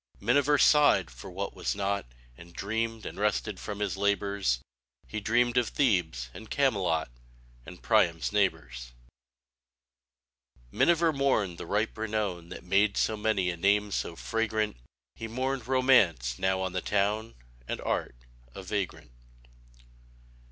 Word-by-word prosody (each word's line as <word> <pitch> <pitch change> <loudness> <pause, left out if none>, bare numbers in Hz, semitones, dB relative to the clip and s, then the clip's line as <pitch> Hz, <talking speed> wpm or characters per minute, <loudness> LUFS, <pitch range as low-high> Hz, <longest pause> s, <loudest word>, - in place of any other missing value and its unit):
[97| - - -17
Miniver 145 +5 +4
sighed 145 - +5
for - - -10
what - - -4
was - - -2
not, 100 -5 -1 0.3
And 85 +4 -14
dreamed, 115 +2 -3
and - - -7
rested 105 -1 -1
from 105 -1 -6
his 105 - -1
labors; 100 -8 +1 0.5
He 110 - -5
dreamed 120 +3 +1
of 120 -2 +3
Thebes 85 - 0
and 110 - -11
Camelot, 95 - +1 0.6
And - - -11
Priam's 85 -2 +2
neighbors. 65 -12 -1 1.8
Miniver 170 - +3
mourned 110 - 0
the - - -7
ripe 105 +4 0
renown 105 -6 -3
That - - -9
made 100 +3 +2
so 110 - +1
many 105 -4 0
a 85 - -7
name 100 +3 +2
so 85 - -2
fragrant; 110 - -1 0.4
He 115 - -5
mourned 130 +1 -3
Romance, 105 - +3
now 95 0 +1
on 95 -1 -2
the 90 - -1
town, 105 +3 0 0.3
And - - -3
Art, - - -2 0.4
a 95 - -7
vagrant. 95 - -4
105 Hz, 135 wpm, -29 LUFS, 90-115 Hz, 1.8 s, sighed